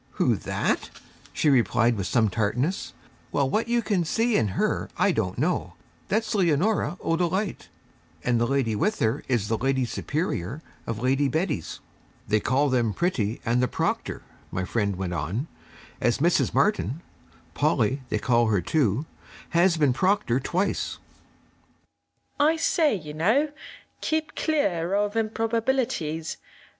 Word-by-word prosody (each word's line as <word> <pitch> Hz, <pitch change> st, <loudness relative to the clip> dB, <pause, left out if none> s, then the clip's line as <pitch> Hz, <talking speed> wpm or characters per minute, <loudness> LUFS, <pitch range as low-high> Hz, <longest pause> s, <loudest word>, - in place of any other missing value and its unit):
'Who, -, -, +2 dB
that?' -, -, -1 dB, 0.4 s
she -, -, 0 dB
replied 120 Hz, -3 st, +3 dB
with 100 Hz, -3 st, -3 dB
some 115 Hz, -3 st, +3 dB
tartness. 115 Hz, -, -1 dB, 0.4 s
'Well, 140 Hz, -2 st, +2 dB
what 215 Hz, -, 0 dB
you 235 Hz, 0 st, +1 dB
can 195 Hz, -5 st, +1 dB
see 225 Hz, +7 st, +1 dB
in 105 Hz, -4 st, +1 dB
her, -, -, 0 dB
I -, -, +3 dB
don't -, -, -1 dB
know. -, -, 0 dB, 0.3 s
That's 220 Hz, +2 st, 0 dB
Leonora 185 Hz, +1 st, +1 dB
O'Dolite, 180 Hz, +5 st, -1 dB, 0.5 s
and 120 Hz, -1 st, +1 dB
the 120 Hz, -, +2 dB
lady 130 Hz, -5 st, +1 dB
with 210 Hz, -, +1 dB
her 115 Hz, +5 st, 0 dB
is 120 Hz, -5 st, 0 dB
the 110 Hz, 0 st, -1 dB
Lady 130 Hz, 0 st, +1 dB
Superior 140 Hz, -, -3 dB, 0.2 s
of 115 Hz, 0 st, -3 dB
Lady 135 Hz, +2 st, +2 dB
Betty's. 155 Hz, -, -2 dB, 0.5 s
'They 105 Hz, +1 st, +3 dB
call 135 Hz, +7 st, +2 dB
them 120 Hz, -5 st, +1 dB
Pretty 120 Hz, -, -1 dB
and 120 Hz, +2 st, +2 dB
the 125 Hz, -, +2 dB
Proctor,' -, -, -2 dB, 0.3 s
my 95 Hz, -, -2 dB
friend 100 Hz, -1 st, 0 dB
went 90 Hz, -1 st, -3 dB
on, 90 Hz, -, -2 dB, 0.5 s
'as 120 Hz, -, +2 dB
Mrs. 170 Hz, +4 st, +2 dB
Martin 185 Hz, -, +1 dB, 0.5 s
Polly 135 Hz, +2 st, +1 dB
they -, -, 0 dB
call 120 Hz, -2 st, +2 dB
her 105 Hz, -3 st, +2 dB
too 125 Hz, -, +1 dB, 0.4 s
has 170 Hz, 0 st, +3 dB
been 145 Hz, -5 st, +3 dB
Proctor 185 Hz, -, +2 dB
twice.' 180 Hz, +8 st, -1 dB, 1.4 s
I 305 Hz, +3 st, +4 dB
say, 325 Hz, -, +2 dB
you 155 Hz, -5 st, -7 dB
know, 225 Hz, -, +2 dB, 0.5 s
keep 315 Hz, 0 st, -1 dB
clear 195 Hz, -, 0 dB
of 205 Hz, +1 st, 0 dB
improbabilities! 225 Hz, -, -1 dB
150 Hz, 140 wpm, -26 LUFS, -, 1.4 s, I